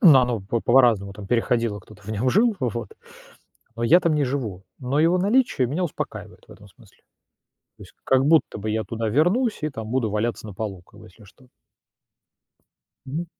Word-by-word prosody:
оно 125 - +5
по 110 +4 -2
по-разному 115 -6 +3 0.2
переходило, 115 -3 0
кто-то 105 +3 -17
в 100 - -14
нём 115 +4 0
жил, 220 +2 +3
вот, - - -3 0.9
но 115 - -4
я 170 +10 +6
там 165 -3 +1
не 150 - +1
живу, 115 -9 -4
но 135 +3 -1
его 170 +3 +3
наличие 205 - +2
меня 155 +9 -2
успокаивает 170 - -7
в - - -12
этом - - -16
смысле. - - -22 0.8
То - - -12
есть - - -18
как 130 0 +3
будто 160 -7 +3
бы 110 +1 -4
я 110 +1 -1
туда 115 -1 -3
вернусь 185 - +1
и 155 - 0
там 110 -5 -7
буду 120 -4 0
валяться 110 +2 -2
на 105 - -9
полу, 100 -3 -5
как - - -20
бы, - - -13
если 100 +4 -18
что. 125 +6 -21 1.6
Мгм. 160 +6 -4
125 Hz, 185 wpm, -23 LUFS, 110-155 Hz, 1.6 s, я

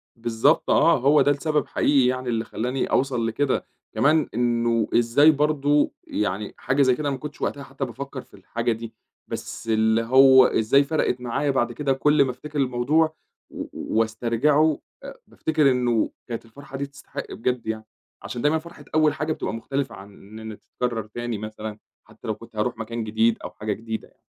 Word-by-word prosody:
بالضبط 115 -1 +1
آه، - - +5
هو 145 +4 +4
ده 145 - +4
السبب 150 +1 0
حقيقي 135 -3 +3
يعني 130 0 -1
اللي 115 -1 -1
خلّاني 125 +4 -2
أوصل 125 -4 +1
لكده 130 +4 0 0.3
كمان 150 +6 +3
إنه 115 -1 +1
إزاي 120 +6 +5
برضه 145 0 +2 0.2
يعني 105 0 -2
حاجة 135 +2 0
زي 130 -2 +4
كده 145 +2 -2
ما 135 - -2
كنتش 145 +2 -9
وقتها 140 - -2
حتى 135 0 -5
بافكّر 130 +2 -7
في - - -25
الحاجة 115 +5 -3
دي، 115 0 -5 0.3
بس - - -7
اللي 110 0 +2
هو 130 +2 +7
إزاي 125 +6 +3
فرقت 140 -4 -1
معايا 125 +4 0
بعد 120 -3 0
كده 135 +2 0
كل 150 +2 +3
ما 130 - -1
أفتكر 145 +4 -6
الموضوع 140 +5 +2 0.3
و - - -6
وأسترجعه، 120 +7 +1 0.2
آآ - - -9
بافتكر 155 -3 +1
إنه 120 -3 +1 0.2
كانت 115 -1 -5
الفرحة 135 +4 -10
دي 140 - -2
تستحق 140 0 -9
بجد 125 0 -2
يعني، 110 0 -3 0.4
عشان 120 - -5
دايمًا 150 +4 +3
فرحة 160 -2 -13
أول 155 -1 +4
حاجة 155 +1 -2
بتبقى - - -4
مختلفة 135 +5 -3
عن 100 +1 -12
إن 105 +3 -13
إن 105 - -11
تتكرّر 120 -2 -3
تاني 120 0 -4
مثلًا 110 0 -7 0.2
حتى - - -14
لو 110 - -1
كنت 115 +1 -15
هاروح 110 +3 -1
مكان 115 +1 -4
جديد 110 +1 +2
أو - - -5
حاجة 105 0 -3
جديدة 110 +1 -6
يعني. - - -31
125 Hz, 180 wpm, -24 LUFS, 115-140 Hz, 0.4 s, هو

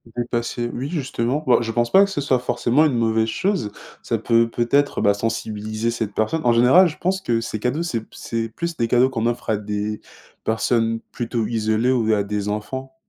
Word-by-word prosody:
D'entasser, 120 0 -2
oui, 130 +3 -3
justement, 135 -3 -2
bah, 125 - +5
je 115 - -3
pense 120 +1 0
pas 195 +1 +7
que - - -7
ce 185 -7 -2
soit 130 -2 +2
forcément 125 +4 +2
une 145 - +1
mauvaise 110 -1 +1
chose. 185 - -1 0.3
Ça - - -1
peut, 115 0 +2
peut-être, 130 +5 +1
bah, 100 - +4
sensibiliser 110 +1 -3
cette 110 -3 -3
personne. 110 +11 0
En 120 - +5
général, 130 +11 +6
je 155 - -7
pense 190 +2 0
que 115 -10 0
ces 110 -1 -4
cadeaux, 130 +9 -1
c'est 125 -9 -2
p - - -18
c'est 115 -1 -4
plus 170 +9 -5
des 115 - +1
cadeaux 125 +2 +4
qu'on 115 -4 -2
offre 120 0 -2
à 110 - +2
des 105 +1 -3 0.5
personnes 115 0 +1
plutôt 115 -1 -2
isolées 110 +2 +1
ou 115 -4 +2
à 105 -1 +1
des 105 0 -3
enfants 130 +6 -4
115 Hz, 205 wpm, -22 LUFS, 110-130 Hz, 0.5 s, pas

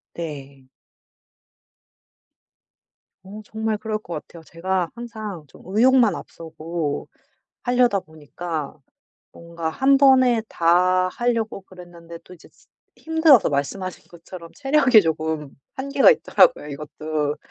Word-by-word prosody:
네. 140 -5 -8 2.5
어 200 +3 -10
정말 220 0 -3
그럴 215 0 -3
것 195 -5 -10
같아요. 165 -1 -14
제가 175 +2 -3
항상 215 -7 -7
좀 - - -18
의욕만 230 +1 +3
앞서고 160 -2 -6 0.5
하려다 245 -4 +2
보니까 155 0 -7 0.5
뭔가 170 -1 -6
1 270 +11 +3
번에 260 -4 +5
다 180 +2 +2
하려고 225 0 -2
그랬는데 175 -3 -13
또 185 - -13
이제 175 - -18
지 - - -28 0.3
힘들어서 320 -6 +4
말씀하신 165 +7 -4
것처럼 170 0 -12
체력이 270 -5 +4
조금 160 -3 -3 0.2
한계가 275 - +4
있더라고요 - - +2
이것도. 150 0 -4
185 Hz, 240 characters per minute, -22 LUFS, 160-230 Hz, 2.5 s, 번에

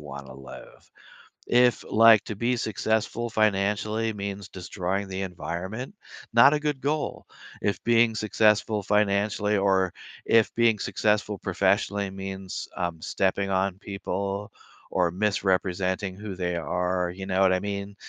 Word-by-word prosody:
wanna 70 -3 -9
live. 65 -1 -13 0.6
If, 125 -1 +3
like, 115 -1 +7
to 110 - -5
be 120 +4 0
successful 110 +2 -1
financially 110 +1 +1
means 100 -1 -5
destroying 95 +2 -3
the 95 0 -4
environment, 95 - -5 0.4
not 120 +5 +7
a 150 - +1
good 150 -3 -2
goal. 150 +2 -2 0.4
If 100 - -1
being 115 -1 +4
successful 110 -1 +2
financially 105 0 +1
or 95 -2 +2 0.3
if 115 -1 +3
being 115 -3 +3
successful 105 -1 0
professionally 100 -1 0
means, 95 0 -6
um, 85 -3 -3
stepping 95 +2 0
on 95 0 0
people 100 0 -4 0.4
or 90 -2 +2
misrepresenting 95 -1 0
who 100 -1 -7
they 90 -1 -2
are, 90 +1 -1
you 95 +1 -7
know 95 -1 -1
what 95 -1 +5
I 90 - +1
mean? 100 0 -5
100 Hz, 135 wpm, -26 LUFS, 95-110 Hz, 0.6 s, like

